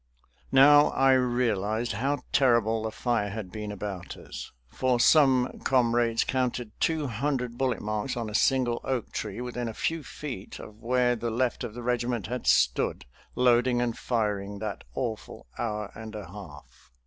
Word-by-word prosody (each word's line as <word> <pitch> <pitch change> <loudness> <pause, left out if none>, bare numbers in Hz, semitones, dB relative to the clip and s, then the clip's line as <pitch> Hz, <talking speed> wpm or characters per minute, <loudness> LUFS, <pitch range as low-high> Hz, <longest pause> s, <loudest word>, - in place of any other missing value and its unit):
Now 145 +2 +7
I 135 0 +4
realized 120 -3 +1
how 130 +5 -1
terrible 115 -4 +3
the 110 0 -3
fire 115 -3 -1
had 100 -3 -6
been 105 +1 -5
about 100 -3 -6
us, - - -9 0.2
for 125 - 0
some 130 -2 +4
comrades 120 -2 +2
counted 125 -3 -1
two 160 -2 +1
hundred 125 0 -2
bullet 130 0 -1
marks 110 +5 -2
on 115 -2 -3
a 105 - -7
single 125 0 +2
oak 130 -4 -2
tree 105 +2 -4
within 125 -1 -4
a 110 - -6
few 165 0 -1
feet 130 -12 -7
of 105 +1 -12
where 125 0 +2
the 115 0 -3
left 120 +1 -1
of 110 - -6
the 120 - -7
regiment 120 -3 -1
had 125 +4 -4
stood 60 0 +2 0.3
loading 125 0 +3
and 120 -2 0
firing 105 -4 -2
that 105 -1 -5
awful 115 -4 -4
hour 105 -3 -3
and 110 -1 -9
a 105 -2 -6
half. 75 -9 -12
120 Hz, 160 wpm, -27 LUFS, 105-125 Hz, 0.3 s, Now